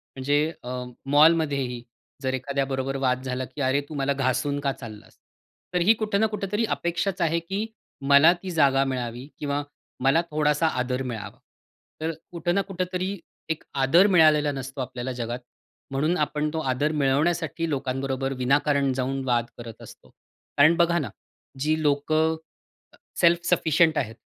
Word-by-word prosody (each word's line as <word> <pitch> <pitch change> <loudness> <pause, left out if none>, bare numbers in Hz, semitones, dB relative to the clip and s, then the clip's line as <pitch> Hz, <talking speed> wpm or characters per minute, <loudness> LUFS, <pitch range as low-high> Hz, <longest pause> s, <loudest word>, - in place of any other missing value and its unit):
म्हणजे 145 +2 +1 0.2
अ, 125 - -7 0.4
मॉलमध्येही 145 -4 +3 0.4
जर 130 0 0
एखाद्याबरोबर 135 0 -2
वाद 130 -1 0
झाला, 130 0 -3
की 145 - -8
"अरे, 135 +2 +2
तू 155 - -7
मला 140 0 0
घासून 140 +2 0
का 140 -1 0
चाललास?" 110 -5 -11 0.6
तर 180 - +2
ही 215 +6 +6
कुठं 215 -2 -1
ना 220 - +4
कुठेतरी 210 +1 -2
अपेक्षाच 175 +2 -1
आहे 165 0 +2
की 195 +6 -3 0.4
मला 140 +4 +8
ती 185 - -4
जागा 140 -4 +3
मिळावी 125 -1 -4
किंवा 145 0 -2 0.4
मला 135 +5 +4
थोडासा 150 +1 +2
आदर 125 -2 -1
मिळावा. 115 -5 -6 0.6
तर 160 +1 -1 0.2
कुठं 175 +1 -1
ना 200 - +3
कुठेतरी 185 +1 -3 0.3
एक 160 - -2 0.2
आदर 170 +9 +6
मिळालेला 155 -5 +5
नसतो 135 0 -6
आपल्याला 125 0 -4
जगात, 120 0 -4 0.5
म्हणून 155 +6 +1
आपण 150 0 0
तो 160 - -1
आदर 145 +4 0
मिळवण्यासाठी 160 +4 +1
लोकांबरोबर 135 -1 -2
विनाकारण 140 +1 +2
जाऊन 135 +1 -2
वाद 120 -2 +1
करत 115 -2 -10
असतो. - - -14 0.5
कारण 155 +4 +6
बघा 170 0 +3
ना, 145 - -3 0.5
जी 155 +2 +1
लोकं 155 +2 +2 0.6
अ, - - -30 0.2
सेल्फ 170 0 +5
सफिशियंट 160 -2 +3
आहेत, 115 -4 -2
145 Hz, 150 wpm, -25 LUFS, 130-165 Hz, 0.6 s, मला